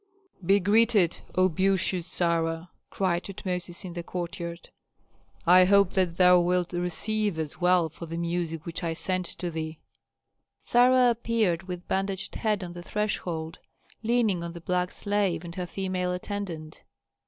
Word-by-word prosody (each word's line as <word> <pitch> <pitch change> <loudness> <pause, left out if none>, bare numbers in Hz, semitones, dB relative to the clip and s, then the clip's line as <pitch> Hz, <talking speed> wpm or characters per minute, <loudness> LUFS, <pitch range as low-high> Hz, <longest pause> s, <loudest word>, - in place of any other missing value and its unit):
"Be 195 +4 +4
greeted. 205 -2 +3 0.2
O 185 0 +5
beauteous 185 0 +1
Sarah!" 165 0 0 0.2
cried 180 -3 0
Tutmosis 180 -2 -4
in 175 - -6
the 175 - -4
courtyard. 170 -1 -6 0.7
"I 180 +1 +7
hope 200 0 +5
that 180 -3 +1
thou 180 -1 +7
wilt 180 0 +1
receive 185 +3 -1
us 160 +1 -5
well 180 -1 +4
for 165 +2 -10
the 165 +1 -5
music 170 -2 -2
which 170 +1 -5
I 165 -1 -1
sent 185 +1 -2
to 175 -1 -5
thee." 160 -1 -4 0.8
Sarah 250 0 +5
appeared, 220 -7 0
with 180 -1 -6
bandaged 195 0 -2
head 210 -4 -1
on 175 -1 -6
the 175 - -8
threshold, 175 -5 -3 0.4
leaning 220 -6 +1
on 170 0 -5
the 170 - -9
black 180 +1 0
slave 200 -5 -1
and 170 - -7
her 180 0 -4
female 185 -1 -2
attendant. 180 -5 -5
180 Hz, 150 wpm, -27 LUFS, 170-195 Hz, 0.8 s, I